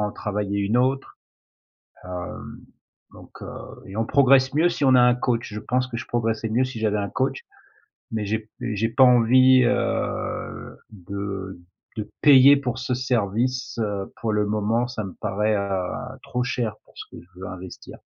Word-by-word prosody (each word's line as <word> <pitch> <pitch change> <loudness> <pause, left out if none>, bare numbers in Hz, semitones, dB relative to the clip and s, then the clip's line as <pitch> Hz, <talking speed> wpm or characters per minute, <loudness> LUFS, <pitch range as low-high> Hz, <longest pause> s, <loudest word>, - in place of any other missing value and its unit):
en 105 0 -1
travailler 100 -1 -3
une 100 +4 +1
autre. 130 +2 0 0.9
Hem, 90 -1 -7 0.6
donc - - -15
heu - - -7 0.4
et 95 - -9
on 115 - 0
progresse 135 0 +4
mieux 160 +4 +4
si 160 - -3
on 130 - +5
a 125 - +6
un 125 0 +5
coach, 120 -3 -2
je 105 - -4
pense 125 +3 -1
que 120 - -7
je 115 - -6
progresserais 115 -2 -1
mieux 120 +4 +2
si 130 -3 -7
j'avais 105 -1 0
un 100 -1 -2
coach 135 +1 -1 0.7
mais 110 -2 -2
j'ai 110 +2 -1
p 110 0 -20
mais 120 -3 -3
j'ai 110 +3 0
pas 130 +3 +4
envie, 130 +1 +6
heu, 120 - -2
de 95 -1 -6 0.4
de 105 - -4
payer 140 -1 +8
pour 130 -2 -3
ce 125 0 -2
service, 125 +1 -1
heu, 100 -2 -4
pour 110 -2 -1
le 105 0 +1
moment 110 +3 0
ça 125 -3 -5
me 95 -2 -7
paraît, 105 +2 0
heu, 95 -2 -2 0.3
trop 125 0 -2
cher 120 -3 -2
pour - - -24
ce - - -7
que - - -11
je 90 +1 -20
veux 95 - -6
investir. 90 0 -10
115 Hz, 185 wpm, -23 LUFS, 100-125 Hz, 0.9 s, payer